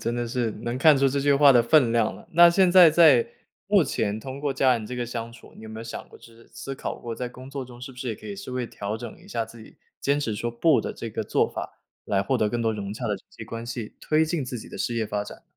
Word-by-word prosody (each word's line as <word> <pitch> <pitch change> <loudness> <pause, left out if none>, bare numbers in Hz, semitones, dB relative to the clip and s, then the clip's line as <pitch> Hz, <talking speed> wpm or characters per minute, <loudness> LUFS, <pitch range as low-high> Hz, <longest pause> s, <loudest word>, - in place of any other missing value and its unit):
真 115 +1 -2
的 120 0 -2
是 120 -1 -1
能 120 +1 -3
看 145 0 +5
出 135 - +4
这 140 +1 -1
句 145 0 +3
话 140 0 +7
的 120 -1 +5
分 125 -2 +4
量 115 -2 +1
了。 - - -14
那 170 +1 +8
现 185 +1 +4
在 175 -3 +8
在 150 -7 +6 0.4
目 - - +4
前 105 +1 -2
通 135 +4 -8
过 145 -2 -1
家 130 -1 +3
人 115 -3 -2
这 125 +3 -6
个 120 -1 -2
相 115 0 -5
处， 115 - -16
你 - - -13
有 110 - -9
没 110 0 -8
有 115 - -7
想 115 - -7
过 - - -16
就 - - -18
是 115 0 -18
思 135 - -7
考 - - -5
过， 115 -1 -6
在 125 +1 -4
工 130 +2 -12
作 140 -1 -5
中 120 -1 -13
是 135 +1 -8
不 125 - -16
是 125 - -4
也 115 - -2
可 - - -13
以 205 - -5
稍 195 -10 -8
微 125 -1 -2
调 105 -1 -5
整 120 - -8
一 195 - -17
下 115 - -2
自 115 0 -13
己， - - -16 0.2
坚 140 +1 +1
持 115 -7 -2
说 120 +3 -3
不 130 +6 +3
的 - - -5
这 115 - -7
个 110 0 -3
做 105 - +1
法， - - -7 0.2
来 100 -1 +1
获 100 - 0
得 105 - +1
更 120 +2 -2
多 115 -1 +1
融 100 -1 -5
洽 - - -6
的 - - -1
人 - - -2
际 - - -10
关 115 0 -7
系， 120 -2 -6
推 155 +1 +2
进 160 -3 -2
自 125 -1 -5
己 - - -11
的 - - -9
事 120 - -2
业 110 -2 -1
发 105 0 -2
展？ - - -11
120 Hz, 330 characters per minute, -25 LUFS, 115-140 Hz, 0.4 s, 那